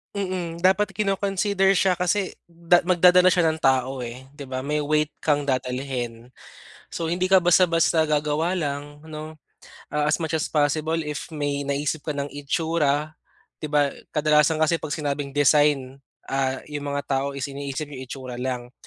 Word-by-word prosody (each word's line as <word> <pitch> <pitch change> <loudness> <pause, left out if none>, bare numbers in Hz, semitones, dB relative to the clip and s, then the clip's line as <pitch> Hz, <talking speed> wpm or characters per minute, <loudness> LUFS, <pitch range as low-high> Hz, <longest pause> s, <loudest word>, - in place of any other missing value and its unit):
Mm, 180 -4 -3
dapat 190 +1 +3
kino-consider 195 0 +1
siya 185 -1 +2
kasi 185 +2 -1
da 170 +1 +2
magdadala 180 0 +5
siya 170 -3 +3
ng 160 - -2
tao 130 -2 +1
eh, 130 +3 -9
'di 140 - -7
ba, 130 0 -4
may 150 +2 -1
weight 150 0 +1
kang 145 -2 +1
dadalhin. 125 -3 -3 0.6
So 165 - -4
hindi 185 +1 0
ka 190 - +6
basta-basta 170 -2 +4
gagawa 150 +4 0
lang 145 -1 -4
'no, 155 0 -8 0.6
ah, 150 0 +1
as - - +2
much 160 -1 -4
as 155 - -1
possible 155 +2 +1
if 150 +3 -5
may 145 -2 -2
naisip 140 +2 -2
ka 150 -1 -4
ng 140 0 -4
itsura, 150 0 0 0.5
'di 155 - -4
ba, 145 -2 +2 0.2
kadalasan 150 0 +3
kasi 160 +1 +1
'pag 155 - -5
sinabing 145 -1 -2
design, 145 -2 +3 0.2
ah, 135 -1 -2
'yung 150 -1 -6 0.2
mga 140 - -4
tao 140 0 -1
is 135 - -2
iniisip 140 +1 -5
'yung 140 -3 -9
itsura 130 -2 -7
lang. 125 0 -4
150 Hz, 160 wpm, -24 LUFS, 140-170 Hz, 0.6 s, ka